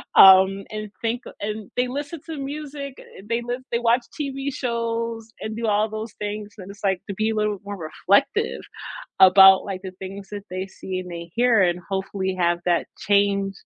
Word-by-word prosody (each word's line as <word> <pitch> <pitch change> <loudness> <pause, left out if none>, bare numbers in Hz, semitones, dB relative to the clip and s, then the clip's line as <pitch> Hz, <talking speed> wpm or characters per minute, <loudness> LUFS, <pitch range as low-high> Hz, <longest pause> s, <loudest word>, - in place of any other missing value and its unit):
um, 190 +1 +8
and 215 -1 -6
think 235 +1 -1
a - - -8
and 210 0 -5
they 250 0 +1
listen 290 +5 -5
to 320 - -5
music, 280 -1 -6
eh, - - -13
they 235 +1 0
live 245 +2 -4
they 235 - +1
watch 240 +1 +3 0.2
TV 275 -1 -3
shows 230 -2 -3
and 220 0 -4
do 230 +1 -3
all 210 +1 +2
those 220 +1 -6
things, 210 0 -4
and 185 - -9
it's, 205 - -16
like, 190 -2 +1
to 200 - -3
be 215 +2 0
a - - -2
little 210 -2 0
more 205 0 -5
reflective 200 - +1 0.6
about, 190 0 +8
like, 190 -2 -4
the 190 - -6
things 195 +1 -8
that 205 -1 -6
they 185 +1 -3
see 190 -1 -5
and 180 -1 -9
they 170 0 -7
hear, 240 -3 +4
and 175 -1 +2
hopefully 190 0 -2
have 175 0 +2
that 175 -1 +2 0.2
change 200 -1 +2
210 Hz, 200 wpm, -23 LUFS, 190-235 Hz, 0.6 s, um